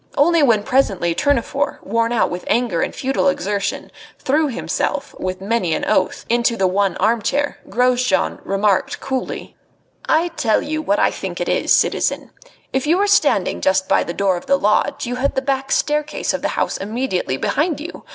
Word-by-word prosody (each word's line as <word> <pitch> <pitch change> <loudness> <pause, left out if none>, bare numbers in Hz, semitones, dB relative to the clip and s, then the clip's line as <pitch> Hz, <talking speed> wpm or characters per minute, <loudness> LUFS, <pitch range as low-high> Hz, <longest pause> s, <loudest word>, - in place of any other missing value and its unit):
Only 335 +3 +4
when 230 -7 +3
presently 195 -10 +1
Tournefort, 285 +5 -1
worn 230 +3 0
out 240 - +1
with 180 - -5
anger 235 -9 +1
and - - -1
futile 270 +1 0
exertion, 205 -6 -2 0.3
threw 300 +3 +1
himself, 260 - -2
with 185 0 -4
many 195 -5 0
an - - -2
oath, 185 - 0
into 235 0 +1
the 195 - +2
one 190 0 +1
armchair, 235 +7 0
Grosjean 250 +1 +1
remarked 195 0 0
coolly: 265 -1 -4 0.5
"I 330 +2 +3
tell 230 -10 0
you 310 +1 -3
what 205 -9 +1
I - - +3
think 185 -2 -6
it 175 - -2
is, - - 0
citizen. - - +1 0.4
If 265 +2 0
you 335 +3 +3
were 405 - +2
standing 410 0 +2
just 190 0 +2
by - - +3
the - - -5
door 190 0 +1
of - - -10
the 275 - +4
lodge 210 +6 +1
you 245 +1 -3
had 275 +2 -1
the 265 - +1
back 270 0 -1
staircase 300 0 0
of - - -3
the - - -2
house - - 0
immediately 200 - -2
behind 305 - 0
you. 325 +3 -8
240 Hz, 180 wpm, -19 LUFS, 195-280 Hz, 0.5 s, Only